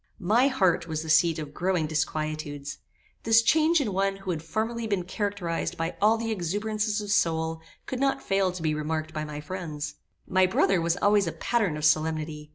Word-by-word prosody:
My 220 Hz, +8 st, +3 dB
heart 190 Hz, -10 st, +1 dB
was 160 Hz, -1 st, -3 dB
the 160 Hz, -, -1 dB
seat 165 Hz, +1 st, +4 dB
of 150 Hz, -2 st, -6 dB
growing 180 Hz, -2 st, 0 dB
disquietudes. 155 Hz, -2 st, -3 dB, 0.4 s
This 225 Hz, +1 st, +5 dB
change 315 Hz, +6 st, +4 dB
in 225 Hz, -9 st, -1 dB
one 195 Hz, +1 st, +1 dB
who 195 Hz, -1 st, -5 dB
had 160 Hz, -3 st, -3 dB
formerly 225 Hz, +7 st, -2 dB
been 200 Hz, -4 st, 0 dB
characterized 190 Hz, -2 st, -3 dB
by 165 Hz, +1 st, -2 dB
all 215 Hz, +2 st, +5 dB
the 225 Hz, 0 st, -3 dB
exuberances 210 Hz, +3 st, -1 dB
of 205 Hz, -1 st, -5 dB
soul, 160 Hz, -3 st, +1 dB, 0.2 s
could 260 Hz, -, -4 dB
not 275 Hz, 0 st, +1 dB
fail 195 Hz, -1 st, +1 dB
to 180 Hz, -2 st, -7 dB
be 155 Hz, -1 st, +1 dB
remarked 155 Hz, +1 st, -3 dB
by 155 Hz, -, -3 dB
my 150 Hz, -1 st, -6 dB
friends. 155 Hz, -2 st, -6 dB, 0.3 s
My 185 Hz, 0 st, +3 dB
brother 185 Hz, -1 st, +2 dB
was 170 Hz, 0 st, +1 dB
always 205 Hz, -2 st, +3 dB
a -, -, -1 dB
pattern 205 Hz, -9 st, 0 dB
of 150 Hz, -, -2 dB
solemnity. 155 Hz, -1 st, 0 dB
180 Hz, 190 wpm, -27 LUFS, 155-210 Hz, 0.4 s, This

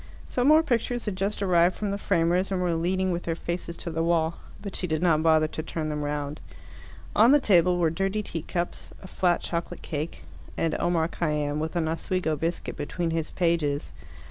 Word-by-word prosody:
Some 250 Hz, +1 st, +1 dB
more 310 Hz, +2 st, +7 dB
pictures 240 Hz, -2 st, -1 dB
had 210 Hz, -3 st, -2 dB
just 200 Hz, +2 st, -1 dB
arrived 175 Hz, -1 st, +4 dB
from 205 Hz, -2 st, -2 dB
the 200 Hz, -, -1 dB
framers 175 Hz, +2 st, +1 dB
and 190 Hz, -, 0 dB
were 180 Hz, -2 st, +1 dB
leaning 185 Hz, +3 st, 0 dB
with 175 Hz, 0 st, -1 dB
their 165 Hz, -1 st, -2 dB
faces 170 Hz, 0 st, -5 dB
to 170 Hz, -, -5 dB
the 160 Hz, 0 st, -1 dB
wall, 165 Hz, 0 st, +1 dB, 0.2 s
but 200 Hz, -2 st, -6 dB
she 180 Hz, -, -2 dB
did 155 Hz, +1 st, -1 dB
not 160 Hz, -3 st, +4 dB
bother 160 Hz, -1 st, +4 dB
to 155 Hz, -, -4 dB
turn 155 Hz, -1 st, -4 dB
them 150 Hz, -1 st, -2 dB
round. 145 Hz, +1 st, -3 dB, 0.7 s
On 225 Hz, +4 st, +7 dB
the 290 Hz, -, +7 dB
table 180 Hz, -, +4 dB
were 165 Hz, -3 st, +2 dB
dirty 195 Hz, +5 st, -1 dB
teacups, 175 Hz, 0 st, -4 dB
a -, -, -8 dB
flat 180 Hz, -2 st, +1 dB
chocolate 170 Hz, 0 st, -4 dB
cake, 155 Hz, +2 st, -4 dB, 0.3 s
and 165 Hz, -1 st, 0 dB
Omar 170 Hz, -2 st, +1 dB
Khayyam, 150 Hz, -3 st, -1 dB
with 160 Hz, +3 st, -3 dB
an 165 Hz, -2 st, +1 dB
Oswego 165 Hz, 0 st, -1 dB
biscuit 165 Hz, +3 st, -3 dB
between 165 Hz, +3 st, -2 dB
his 160 Hz, -1 st, -1 dB
pages. 165 Hz, -5 st, 0 dB
170 Hz, 195 wpm, -26 LUFS, 160-185 Hz, 0.7 s, more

